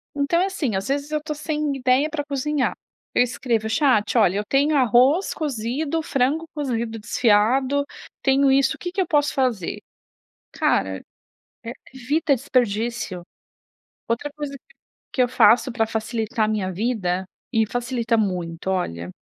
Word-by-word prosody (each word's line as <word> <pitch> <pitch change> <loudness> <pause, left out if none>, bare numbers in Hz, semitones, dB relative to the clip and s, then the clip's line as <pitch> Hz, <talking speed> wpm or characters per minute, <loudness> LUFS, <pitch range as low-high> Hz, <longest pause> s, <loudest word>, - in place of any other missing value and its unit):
Então, 290 +4 +1
é - - +3
assim: 320 - -2
às 195 +2 -2
vezes, 285 +2 -2
eu 305 0 -1
tô 310 -1 -3
sem 300 -1 -2
ideia 265 +3 +2
pra 300 -2 -3
cozinhar. 285 -1 -1 0.4
Eu - - +6
escrevo: 235 -3 -1
"Chat, 225 -3 +2
olha, 200 -4 +4
eu 205 - -1
tenho 285 +6 +2
arroz 265 - +4
cozido, 280 +3 -2
frango 285 +2 0
cozido 235 -6 -3
desfiado. 250 +6 +2 0.4
Tenho 270 0 +3
isso. 270 0 +3
O - - -19
quê 355 - -4
que 380 +1 -1
eu 365 - -1
posso 295 -3 +2
fazer? 245 -10 -1 0.7
Cara, 95 -1 0 0.6
e 230 - -5 0.2
evita 285 +4 +1
desperdício. 235 -6 -1 0.9
Outra 235 +6 -2
coisa 295 -2 -5
que 485 - -28 0.4
que 255 - +3
eu 245 - +3
faço 240 +2 +4
pra 225 -1 +1
facilitar 220 +1 -1
a - - -2
minha 205 -3 -1
vida 190 -3 -1 0.3
e 220 -1 +2
facilita 240 0 -1
muito, 180 -5 -2
olha 90 - -3
250 Hz, 155 wpm, -23 LUFS, 220-285 Hz, 0.9 s, Eu